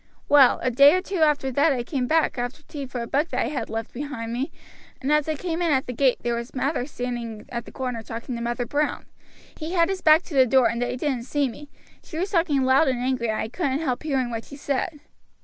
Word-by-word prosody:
"Well, 280 Hz, -3 st, +6 dB
a 255 Hz, -, +1 dB
day 280 Hz, +6 st, +7 dB
or 370 Hz, -, +1 dB
two 390 Hz, -1 st, -4 dB
after 295 Hz, -4 st, +2 dB
that 285 Hz, +5 st, +3 dB
I 250 Hz, -3 st, -1 dB
came 250 Hz, 0 st, -2 dB
back 315 Hz, -4 st, +2 dB
after 245 Hz, +5 st, -4 dB
tea 285 Hz, -3 st, -7 dB
for 250 Hz, -2 st, -4 dB
a -, -, -6 dB
book 295 Hz, +7 st, 0 dB
that -, -, -2 dB
I -, -, -2 dB
had 265 Hz, -6 st, -4 dB
left 225 Hz, 0 st, -4 dB
behind 245 Hz, -4 st, -5 dB
me, 265 Hz, +6 st, -2 dB, 0.5 s
and 275 Hz, +2 st, -1 dB
as 300 Hz, 0 st, +2 dB
I 310 Hz, -, 0 dB
came 335 Hz, +2 st, -3 dB
in 335 Hz, -2 st, +2 dB
at 265 Hz, -2 st, +2 dB
the 250 Hz, -, -5 dB
gate 260 Hz, +1 st, +3 dB
there 235 Hz, 0 st, -1 dB
Mather 275 Hz, +4 st, 0 dB
was 250 Hz, -, -4 dB
standing 240 Hz, -4 st, -5 dB
at 235 Hz, -1 st, -5 dB
the -, -, -11 dB
corner 250 Hz, -3 st, -4 dB
talking 230 Hz, +2 st, -6 dB
to 235 Hz, -, -5 dB
Mother 240 Hz, +1 st, -2 dB
Brown. 290 Hz, +5 st, -1 dB, 0.5 s
He 320 Hz, +2 st, -5 dB
had 335 Hz, -1 st, +3 dB
his 385 Hz, -1 st, -2 dB
back 315 Hz, +2 st, +6 dB
to 335 Hz, -, -11 dB
the 260 Hz, -2 st, +5 dB
door, 260 Hz, 0 st, +5 dB
and 235 Hz, +1 st, -3 dB
they 245 Hz, 0 st, -1 dB
didn't 255 Hz, -3 st, -2 dB
see 285 Hz, +1 st, 0 dB
me. 285 Hz, +4 st, -10 dB, 0.3 s
She 320 Hz, -, -8 dB
was 375 Hz, +4 st, -2 dB
talking 330 Hz, -7 st, +2 dB
loud 260 Hz, +4 st, +4 dB
and 260 Hz, -2 st, +1 dB
angry 250 Hz, -2 st, -1 dB
and 215 Hz, -, -1 dB
I -, -, -2 dB
couldn't 275 Hz, +1 st, -1 dB
help 255 Hz, -6 st, -1 dB
hearing 265 Hz, -5 st, -1 dB
what 225 Hz, -1 st, -4 dB
she 285 Hz, -, -10 dB
said." 285 Hz, +2 st, -3 dB
265 Hz, 255 wpm, -24 LUFS, 245-300 Hz, 0.5 s, day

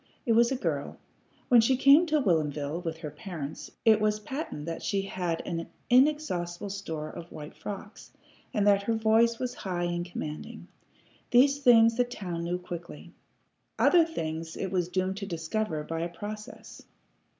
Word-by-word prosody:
It 235 Hz, -, +1 dB
was 235 Hz, +2 st, +4 dB
a -, -, +1 dB
girl. 255 Hz, -, -3 dB, 0.5 s
When 245 Hz, -3 st, +7 dB
she 255 Hz, +3 st, +3 dB
came 280 Hz, +6 st, +6 dB
to 310 Hz, -1 st, +2 dB
Whilomville 155 Hz, -, 0 dB
with 165 Hz, -2 st, -3 dB
her 155 Hz, -3 st, -7 dB
parents, 155 Hz, -2 st, -7 dB, 0.2 s
it 220 Hz, -1 st, +6 dB
was 215 Hz, 0 st, +1 dB
patent 215 Hz, -, -5 dB
that 165 Hz, 0 st, -5 dB
she 195 Hz, -1 st, -1 dB
had 180 Hz, -4 st, -3 dB
an 165 Hz, 0 st, -4 dB, 0.2 s
inexhaustible 210 Hz, -, +2 dB
store 160 Hz, -6 st, -5 dB
of 170 Hz, -, -10 dB
white 150 Hz, 0 st, -9 dB
frocks, 205 Hz, +1 st, -8 dB, 0.4 s
and 205 Hz, -2 st, +1 dB
that 200 Hz, -1 st, +5 dB
her 225 Hz, +3 st, 0 dB
voice 225 Hz, +1 st, +3 dB
was 250 Hz, 0 st, -3 dB
high 180 Hz, -3 st, -3 dB
and 175 Hz, 0 st, -1 dB
commanding. 155 Hz, -3 st, -7 dB, 0.6 s
These 275 Hz, +3 st, +5 dB
things 230 Hz, -4 st, +6 dB
the 245 Hz, -, +4 dB
town 185 Hz, -9 st, -5 dB
knew 175 Hz, +1 st, -1 dB
quickly. 175 Hz, -1 st, -9 dB, 0.6 s
Other 345 Hz, -2 st, +6 dB
things 160 Hz, -, -4 dB
it 190 Hz, -, -3 dB
was 180 Hz, -2 st, 0 dB
doomed 185 Hz, +1 st, -1 dB
to 200 Hz, -1 st, -5 dB
discover 165 Hz, -1 st, -2 dB
by 165 Hz, +1 st, -4 dB
a 170 Hz, +1 st, -2 dB
process. 210 Hz, +7 st, -8 dB
195 Hz, 165 wpm, -28 LUFS, 170-230 Hz, 0.6 s, When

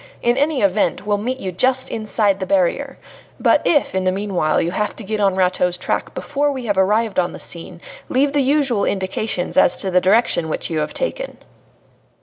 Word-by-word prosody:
In 240 Hz, 0 st, +3 dB
any 290 Hz, 0 st, 0 dB
event, 200 Hz, -1 st, +1 dB
we'll 205 Hz, -1 st, 0 dB
meet 250 Hz, +5 st, -3 dB
you 190 Hz, -, -4 dB
just 260 Hz, +8 st, +1 dB
inside 215 Hz, -2 st, 0 dB
the 190 Hz, -, -4 dB
barrier. 200 Hz, +10 st, 0 dB, 0.4 s
But -, -, +3 dB
if, 295 Hz, -4 st, +2 dB
in 190 Hz, 0 st, -1 dB
the 185 Hz, -, +2 dB
meanwhile, 190 Hz, -5 st, 0 dB
you 170 Hz, -, -1 dB
have 210 Hz, +3 st, -2 dB
to 225 Hz, -, -6 dB
get 215 Hz, +1 st, -3 dB
on 195 Hz, -2 st, +2 dB
Rateau's 180 Hz, -1 st, +1 dB
track -, -, -3 dB
before 290 Hz, 0 st, -1 dB
we 260 Hz, -3 st, -5 dB
have 205 Hz, -3 st, 0 dB
arrived 210 Hz, +2 st, +1 dB
on 175 Hz, -, -1 dB
the -, -, -9 dB
scene, 170 Hz, 0 st, -2 dB, 0.3 s
leave 275 Hz, +2 st, +1 dB
the 290 Hz, -, +2 dB
usual 270 Hz, -6 st, +2 dB
indications 190 Hz, -1 st, -2 dB
as 180 Hz, -, +4 dB
to 190 Hz, -, -2 dB
the 180 Hz, 0 st, +3 dB
direction 190 Hz, -4 st, +2 dB
which 155 Hz, -, -3 dB
you 160 Hz, -, -1 dB
have 150 Hz, -, -3 dB
taken." -, -, -3 dB
205 Hz, 200 wpm, -19 LUFS, 185-255 Hz, 0.4 s, as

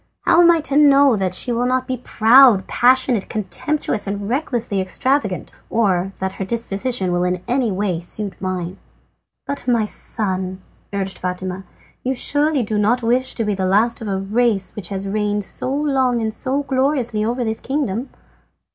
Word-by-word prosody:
How 340 Hz, -, +4 dB
am 345 Hz, -, +6 dB
I 335 Hz, -2 st, +4 dB
to 290 Hz, -2 st, -2 dB
know 280 Hz, -3 st, +6 dB
that 185 Hz, -3 st, -1 dB
she 245 Hz, -, -2 dB
will 240 Hz, +1 st, 0 dB
not 255 Hz, 0 st, 0 dB
be 255 Hz, -, -3 dB
proud, 235 Hz, -2 st, +5 dB
passionate, 250 Hz, -3 st, +2 dB
contemptuous, 215 Hz, -, -2 dB
and 200 Hz, 0 st, -3 dB
recklessly 235 Hz, -6 st, -1 dB
extravagant, 205 Hz, +1 st, -1 dB, 0.2 s
or 195 Hz, -4 st, +1 dB
that 190 Hz, 0 st, -3 dB
her 195 Hz, -, -5 dB
disposition 215 Hz, -1 st, -2 dB
will 175 Hz, 0 st, +1 dB
in 180 Hz, 0 st, -1 dB
any 245 Hz, -3 st, +1 dB
way 190 Hz, -3 st, -1 dB
suit 195 Hz, +3 st, -2 dB
mine?" 185 Hz, -1 st, -4 dB, 0.7 s
"But, 280 Hz, -3 st, -5 dB
my 235 Hz, -3 st, +2 dB
son," 190 Hz, -3 st, -2 dB, 0.3 s
urged 195 Hz, -1 st, -3 dB
Fatima, 185 Hz, +1 st, -4 dB, 0.4 s
"you 260 Hz, +1 st, -1 dB
surely 290 Hz, +1 st, +1 dB
do 210 Hz, -1 st, -1 dB
not 235 Hz, +4 st, +2 dB
wish 250 Hz, +3 st, +1 dB
to 230 Hz, -, -1 dB
be 210 Hz, -, 0 dB
the 190 Hz, -1 st, -1 dB
last 220 Hz, +6 st, +2 dB
of 220 Hz, -, -5 dB
a 195 Hz, -1 st, -1 dB
race 205 Hz, 0 st, 0 dB
which 200 Hz, -5 st, -5 dB
has 195 Hz, 0 st, -3 dB
reigned 210 Hz, 0 st, -1 dB
so 255 Hz, -, -3 dB
long 270 Hz, -4 st, +1 dB
and 220 Hz, -1 st, -2 dB
so 265 Hz, +5 st, -1 dB
gloriously 260 Hz, -5 st, 0 dB
over 240 Hz, +3 st, -1 dB
this 220 Hz, -1 st, -2 dB
kingdom?" 265 Hz, -4 st, -2 dB
220 Hz, 175 wpm, -20 LUFS, 195-255 Hz, 0.7 s, am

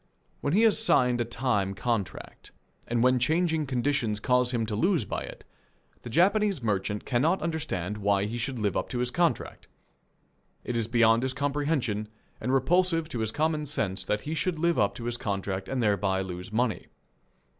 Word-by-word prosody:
When 145 Hz, -, -1 dB
he 215 Hz, +5 st, +4 dB
has 220 Hz, -1 st, +4 dB
signed 125 Hz, -, +3 dB
a -, -, 0 dB
time 115 Hz, -5 st, -1 dB
contract 100 Hz, -6 st, -4 dB, 0.4 s
and 120 Hz, 0 st, +1 dB
when 130 Hz, 0 st, +4 dB
changing 160 Hz, +3 st, +1 dB
conditions 125 Hz, -4 st, 0 dB
cause 125 Hz, +1 st, +2 dB
him 115 Hz, -3 st, 0 dB
to 110 Hz, -1 st, -3 dB
lose 170 Hz, -, +2 dB
by -, -, -3 dB
it, -, -, -9 dB, 0.6 s
the -, -, -8 dB
Japanese 195 Hz, -, +2 dB
merchant 105 Hz, -1 st, -1 dB
cannot 145 Hz, +9 st, +2 dB
understand 105 Hz, -, -3 dB
why 100 Hz, -1 st, +2 dB
he 115 Hz, +3 st, -4 dB
should 130 Hz, +2 st, -3 dB
live 105 Hz, -5 st, -1 dB
up -, -, -2 dB
to 125 Hz, -, -3 dB
his 125 Hz, 0 st, 0 dB
contract. 175 Hz, +2 st, -1 dB, 1.0 s
It 120 Hz, -, -3 dB
is 115 Hz, -2 st, 0 dB
beyond 115 Hz, -1 st, +4 dB
his 130 Hz, 0 st, -2 dB
comprehension 140 Hz, -6 st, -1 dB, 0.3 s
and 125 Hz, -, -2 dB
repulsive 165 Hz, +3 st, +2 dB
to 125 Hz, -, -4 dB
his 110 Hz, -1 st, -1 dB
common 155 Hz, +1 st, 0 dB
sense 100 Hz, -9 st, -2 dB
that 105 Hz, +2 st, -1 dB
he 150 Hz, -, -4 dB
should 160 Hz, +3 st, -1 dB
live 170 Hz, +1 st, +1 dB
up 100 Hz, -1 st, +2 dB
to 120 Hz, -, -7 dB
his 120 Hz, 0 st, -2 dB
contract 95 Hz, -3 st, -3 dB
and 130 Hz, -2 st, -1 dB
thereby 100 Hz, -2 st, +1 dB
lose 90 Hz, +1 st, -6 dB
money. 115 Hz, +1 st, -1 dB
120 Hz, 180 wpm, -27 LUFS, 105-150 Hz, 1.0 s, he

